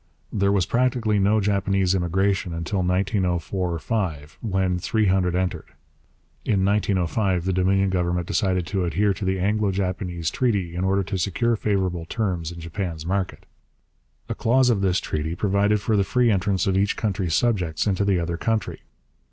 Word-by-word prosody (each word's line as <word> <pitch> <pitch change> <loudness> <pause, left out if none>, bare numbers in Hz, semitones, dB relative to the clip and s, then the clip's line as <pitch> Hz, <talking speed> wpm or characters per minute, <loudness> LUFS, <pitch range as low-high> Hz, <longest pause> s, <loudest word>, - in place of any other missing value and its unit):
There 100 -1 +2
was 100 -3 +2
practically 120 -2 +1
no 105 +3 +3
Japanese 100 -2 +1
immigration 95 0 0
until 85 +4 -2
1904 90 -2 0
5, 80 -7 -3
when 95 -4 0
three 110 +4 0
hundred 95 -2 +2
entered. 90 -3 -2 0.7
In 95 -3 +1
1905 95 -2 +1
the 95 - 0
Dominion 95 +1 +2
Government 90 -1 0
decided 95 -2 0
to 95 +1 -1
adhere 100 +5 +1
to 95 - -7
the 95 0 0
Anglo 105 +2 +1
Japanese 90 -3 -2
treaty 100 -10 0
in 90 +2 -2
order 95 +1 +1
to 95 +1 -3
secure 115 +6 +1
favourable 95 -5 -1
terms 90 -6 -2
in 85 - -9
Japan's 85 -1 -5
market. 95 +1 -2 0.8
A - - -2
clause 125 +2 +3
of 105 -4 0
this 95 -1 +2
treaty 80 +2 -3
provided 100 +2 +2
for 110 +2 0
the 100 - +3
free 120 +4 +2
entrance 95 -1 +1
of 95 - +1
each 100 +1 +1
country's 95 -6 -1
subjects 90 -10 +1
into 100 -1 +1
the 100 -2 +2
other 85 0 -2
country. 110 +3 -1
95 Hz, 165 wpm, -24 LUFS, 90-100 Hz, 0.8 s, no